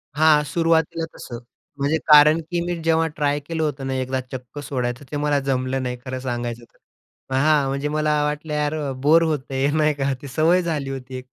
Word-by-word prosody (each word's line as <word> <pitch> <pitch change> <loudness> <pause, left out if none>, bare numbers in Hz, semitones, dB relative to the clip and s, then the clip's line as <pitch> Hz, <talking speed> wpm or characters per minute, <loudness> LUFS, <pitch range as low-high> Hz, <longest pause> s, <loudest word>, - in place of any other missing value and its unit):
हां, 150 -1 +5
सुरुवातीला 165 +1 +1
तसं. 120 - -8 0.4
म्हणजे 145 +3 +1
कारण 150 +1 +7
की 175 - 0
मी 175 0 -2
जेव्हा 165 0 +2
ट्राय 145 -1 0
केलं 160 +2 -3
होतं 140 -3 -3
ना 135 - -2
एकदा 130 0 -1
चक्क 130 +2 -8
सोडायचं 125 -1 -3
ते 150 - -2
मला 145 0 +1
जमलं 135 -1 -1
नाही 125 -1 -3
खरं 130 0 -4
सांगायचं 120 -2 -4
तर. - - -22 0.6
हां, 145 0 +3
म्हणजे 140 +2 -2
मला 150 0 +1
वाटलं 150 +1 -3
यार 150 0 0 0.3
बोर 160 +4 +5
होत 155 -3 0
आहे 135 +1 +1
नाही 155 0 +2
का 140 -1 -1
ते 140 - -8
सवय 160 +7 +3
झाली 155 -6 -2
होती 130 -1 -7
एक. 130 - -9
145 Hz, 195 wpm, -22 LUFS, 130-155 Hz, 0.6 s, कारण